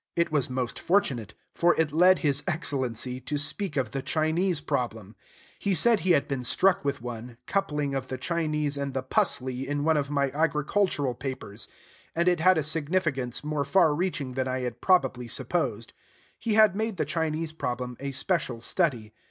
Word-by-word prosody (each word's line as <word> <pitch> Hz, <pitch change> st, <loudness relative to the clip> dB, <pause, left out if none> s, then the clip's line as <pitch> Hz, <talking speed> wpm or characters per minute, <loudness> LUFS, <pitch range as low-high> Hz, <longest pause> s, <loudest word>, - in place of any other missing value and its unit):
It 170 Hz, -1 st, +1 dB
was 145 Hz, -5 st, +1 dB
most 125 Hz, -2 st, -3 dB
fortunate; 130 Hz, -, 0 dB, 0.2 s
for 175 Hz, 0 st, +3 dB
it 160 Hz, -2 st, +2 dB
led 180 Hz, +4 st, +5 dB
his 145 Hz, -1 st, +1 dB
Excellency 130 Hz, -7 st, -1 dB
to 145 Hz, +4 st, -3 dB
speak 145 Hz, +6 st, -1 dB
of 125 Hz, -5 st, 0 dB
the 135 Hz, -, -3 dB
Chinese 160 Hz, +4 st, +1 dB
problem. 115 Hz, -8 st, -3 dB, 0.4 s
He 200 Hz, -2 st, 0 dB
said 225 Hz, +6 st, +4 dB
he 185 Hz, -2 st, +3 dB
had 140 Hz, -3 st, +2 dB
been 135 Hz, -3 st, -3 dB
struck 185 Hz, +10 st, +3 dB
with 140 Hz, -3 st, -2 dB
one, 120 Hz, 0 st, -7 dB
coupling 150 Hz, -8 st, -1 dB
of 135 Hz, -1 st, -3 dB
the 130 Hz, -, -4 dB
Chinese 150 Hz, -1 st, -1 dB
and 140 Hz, -1 st, -3 dB
the 130 Hz, -, -1 dB
"pusley" 130 Hz, 0 st, 0 dB
in 145 Hz, 0 st, -1 dB
one 160 Hz, 0 st, +3 dB
of 140 Hz, -1 st, -1 dB
my 140 Hz, -2 st, +1 dB
agricultural 150 Hz, -1 st, +1 dB
papers; 125 Hz, -4 st, -6 dB, 0.5 s
and 170 Hz, +2 st, +1 dB
it 175 Hz, -1 st, +3 dB
had 185 Hz, +2 st, +5 dB
a 155 Hz, -, +1 dB
significance 150 Hz, -5 st, -1 dB
more 150 Hz, -1 st, -1 dB
far 160 Hz, +2 st, +4 dB
reaching 150 Hz, -5 st, -2 dB
than 130 Hz, 0 st, -1 dB
I 130 Hz, 0 st, -2 dB
had 120 Hz, -2 st, -5 dB
probably 130 Hz, -10 st, +2 dB
supposed. 120 Hz, -5 st, -2 dB, 0.5 s
He 225 Hz, -2 st, 0 dB
had 215 Hz, -3 st, +6 dB
made 220 Hz, -1 st, -2 dB
the 155 Hz, -, 0 dB
Chinese 160 Hz, +1 st, -2 dB
problem 125 Hz, -4 st, -3 dB
a 140 Hz, -, -4 dB
special 135 Hz, -, -1 dB
study. 120 Hz, -, 0 dB
145 Hz, 180 wpm, -27 LUFS, 130-170 Hz, 0.5 s, had